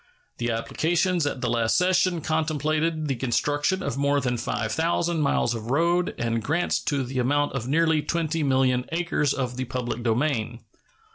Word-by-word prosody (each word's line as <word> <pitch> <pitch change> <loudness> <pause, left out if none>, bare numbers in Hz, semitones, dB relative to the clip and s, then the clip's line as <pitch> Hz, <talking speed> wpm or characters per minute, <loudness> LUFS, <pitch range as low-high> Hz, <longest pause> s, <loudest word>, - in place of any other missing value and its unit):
The 120 0 -1
applications 165 +8 0
at 135 - -3
the 125 - 0
last 115 -1 +2
session 180 -1 +2
contemplated 155 0 0
the 135 - 0
construction 145 +9 0
of 130 - -3
more 140 0 +2
than 125 -2 -1
5,000 160 +9 -1
miles 140 -4 +1
of 115 0 -6
road 170 +5 +1
and 115 -1 -1
grants 160 +10 0
to 140 -3 0
the 130 +1 -3
amount 145 +4 +1
of 130 -3 -3
nearly 160 +2 +2
20,000,000 140 -6 +1
acres 165 -4 0
of 125 -3 -2
the 130 - -2
public 120 -1 -4
domain. 120 -1 -1
145 Hz, 155 wpm, -25 LUFS, 125-160 Hz, -, last